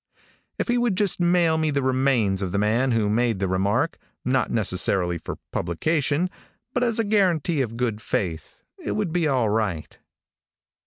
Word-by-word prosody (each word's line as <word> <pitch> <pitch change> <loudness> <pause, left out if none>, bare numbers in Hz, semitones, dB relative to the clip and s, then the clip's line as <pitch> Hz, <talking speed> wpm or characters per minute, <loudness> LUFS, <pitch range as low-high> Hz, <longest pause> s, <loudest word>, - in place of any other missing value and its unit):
If - - -2
he 240 0 +2
would 240 -5 +1
just 200 -2 0
mail 175 -2 +3
me 155 -1 +1
the 140 -2 0
remains 130 -7 +2
of 95 -2 -2
the 100 - -1
man 110 +6 +2
who 115 -3 +1
made 115 +1 +1
the 95 0 -1
remark, 100 - 0 0.3
not 130 -1 +1
necessarily 90 -4 0
for - - -6 0.2
publication, 145 - 0 0.5
but 250 - +1
as 235 -3 0
a 230 - +2
guarantee 180 -7 +2
of 115 -3 -3
good 115 -3 -1
faith, 85 -7 -3 0.2
it - - -3
would 205 -6 -2
be 175 -3 +2
all 130 -6 +2
right. 105 -8 -2
130 Hz, 170 wpm, -24 LUFS, 105-165 Hz, 0.5 s, mail